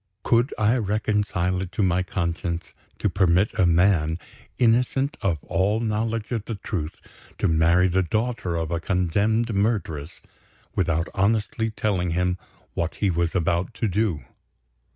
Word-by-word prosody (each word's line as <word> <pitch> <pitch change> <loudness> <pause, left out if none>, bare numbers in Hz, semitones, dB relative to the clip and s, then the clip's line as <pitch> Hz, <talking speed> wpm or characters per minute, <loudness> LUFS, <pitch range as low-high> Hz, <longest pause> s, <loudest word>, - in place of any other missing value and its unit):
Could 120 +3 +3
I 110 +3 +3
reconcile 105 -4 0
it 95 -1 -5
to 100 - 0
my 90 -1 +2
conscience 85 -1 -3 0.2
to - - 0
permit 95 +1 +3
a 90 - +3
man, 85 -2 +3 0.4
innocent 125 +5 +2
of 90 -5 +1
all 95 +4 +1
knowledge 110 0 -2
of 115 -3 -2
the 115 - -4
truth, 90 -6 -4 0.4
to - - +1
marry 85 +3 +4
the 95 +1 +2
daughter 110 -1 -1
of 80 -1 -2
a 85 - 0
condemned 100 +7 +1
murderess, 100 -8 -1 0.6
without 85 -2 +1
honestly 110 +2 +1
telling 100 -5 -1
him 90 0 0 0.3
what 85 -1 -2
he 100 -3 +1
was 85 +1 0
about 85 0 0
to 115 - 0
do? 95 - 0
95 Hz, 145 wpm, -24 LUFS, 85-110 Hz, 0.6 s, marry